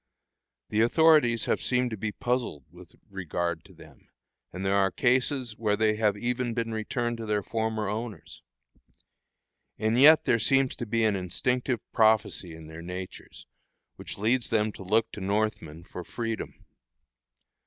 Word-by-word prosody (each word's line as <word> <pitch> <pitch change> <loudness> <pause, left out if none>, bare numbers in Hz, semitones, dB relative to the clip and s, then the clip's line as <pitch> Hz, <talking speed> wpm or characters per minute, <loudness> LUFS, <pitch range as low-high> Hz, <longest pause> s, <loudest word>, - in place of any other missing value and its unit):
The 105 - +1
authorities 120 -3 +4
have - - 0
seemed 125 -1 0
to - - -2
be 105 +1 -3
puzzled 120 - -2
with - - -15
regard 85 -3 -3
to - - -16
them; - - -17 0.4
and 95 +2 -5
there 95 - +2
are 100 -1 +3
cases 125 +1 +1
where 105 -2 +1
they 110 0 +2
have 105 -2 +1
even 120 +1 -2
been 115 -1 -2
returned 120 +2 -2
to 115 -1 -6
their 105 -1 0
former 110 -1 -2
owners. 105 -5 -6 1.4
And 110 +3 +1
yet 155 +3 +7
there 115 - +3
seems 135 +3 +2
to 120 - -5
be 115 +2 +1
an 110 -2 +2
instinctive 120 +7 -1
prophecy 110 -6 +2
in 80 -1 -11
their 80 +1 -10
natures, 90 +2 -8 0.5
which - - -8
leads 115 +4 +1
them 110 -1 +1
to - - -12
look 110 +4 +1
to 105 - -8
Northmen 95 -5 -2
for 90 0 -8
freedom. 115 +3 -5
110 Hz, 155 wpm, -27 LUFS, 100-120 Hz, 1.4 s, yet